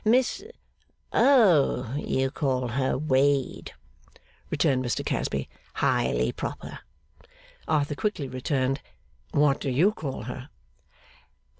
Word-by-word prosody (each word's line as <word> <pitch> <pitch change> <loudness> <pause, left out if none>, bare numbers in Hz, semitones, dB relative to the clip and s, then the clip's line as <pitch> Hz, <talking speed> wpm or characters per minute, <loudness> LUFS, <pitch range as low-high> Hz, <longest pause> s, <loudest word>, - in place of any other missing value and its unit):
'Miss? 245 - +2 0.7
Oh, 170 - +4
you 135 -2 -1
call 130 -5 -1
her 130 +2 0
Wade,' 140 - +1 0.7
returned 130 -1 +1
Mr 120 -5 -2
Casby. 70 0 -2 0.3
'Highly 60 +1 +1
proper.' - - -6 0.9
Arthur 150 -2 +1
quickly 160 -3 -2
returned, 130 +1 -1 0.5
'What 145 -2 +3
do 140 - -1
you 155 +11 +3
call 140 - -5
her? 125 +4 -7
135 Hz, 100 wpm, -26 LUFS, 130-155 Hz, 0.9 s, Oh